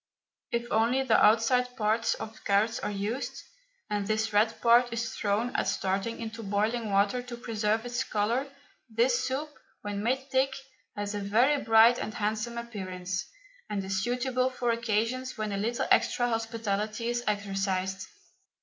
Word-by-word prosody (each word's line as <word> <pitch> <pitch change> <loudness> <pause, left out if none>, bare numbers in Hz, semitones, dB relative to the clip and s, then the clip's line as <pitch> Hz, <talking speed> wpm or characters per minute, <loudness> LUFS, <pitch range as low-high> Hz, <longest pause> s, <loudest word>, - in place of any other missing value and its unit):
If 235 0 -1
only 235 +4 +3
the 235 -4 +4
outside 250 +3 +3
parts 220 +1 +1
of 220 0 -9
carrots 210 +3 +2
are - - -3
used, 210 +6 -3 0.4
and 205 -2 -2
this 220 0 0
red 220 +2 +2
part 240 +1 +5
is 230 -1 -3
thrown, 215 +4 -1
at - - +1
starting, 195 +4 -1
into 225 0 -6
boiling 215 +2 -1
water 200 +5 +2
to 245 -1 -8
preserve 220 -1 -1
its 245 0 -1
colour, 230 +6 0 0.4
this 240 +3 +2
soup, 265 +4 -2 0.4
when 205 -1 -3
made 260 +4 0
thick, 265 0 +2 0.4
has 205 0 -3
a 205 - -2
very 240 +8 +3
bright 225 +2 +6
and 215 - -4
handsome 215 +3 -2
appearance, 185 -5 -4 0.4
and 205 -2 -2
is 190 0 -1
suitable 255 +2 0
for 250 -2 -1
occasions 230 +3 -1
when 215 -1 -2
a 200 - -2
little 230 +4 -1
extra 245 - +3
hospitality 225 -1 -2
is 240 0 -1
exercised. 195 -2 -1
225 Hz, 155 wpm, -29 LUFS, 205-240 Hz, 0.4 s, bright